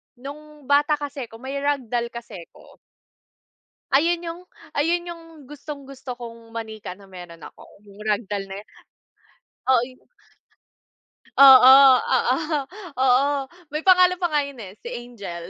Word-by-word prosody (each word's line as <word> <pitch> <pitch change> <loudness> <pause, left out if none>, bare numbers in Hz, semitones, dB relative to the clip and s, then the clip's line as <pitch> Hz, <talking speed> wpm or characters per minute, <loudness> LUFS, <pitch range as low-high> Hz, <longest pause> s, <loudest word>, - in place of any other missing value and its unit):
nung 295 +3 -11
bata 290 +2 +3
kase 285 -2 -6
'ko 225 - -15
may 270 +2 -5
rag 285 -1 0
doll 240 -1 0
kase 220 -7 -9
'ko. - - -18 1.1
Ayun 335 +5 +2
yung 335 +1 -6 0.3
ayun 335 +5 0
yung 340 -1 -9 0.3
gustong-gusto 275 -3 -9
kong 230 -1 -12
manika 220 -4 -7
na 195 0 -18
meron 175 -3 -12
ako, - - -13 0.2
yung 200 0 -17
rag 210 +1 +1
doll 200 -1 -3
na 195 +1 -8
yun, - - -35 1.0
oo, 255 -3 +4
yun. 255 +1 -9 1.4
Oo, 265 -1 +10 0.3
oo, 255 0 +1 0.6
oo, 260 +2 +3 0.4
may 305 - -2
pangalan 365 0 +4
pa 350 - +1
nga 295 -2 +1
yun 275 -4 -10
eh, 195 0 -11
si 240 +3 -8
Angel, 200 -8 -8
260 Hz, 145 wpm, -23 LUFS, 225-295 Hz, 1.4 s, Oo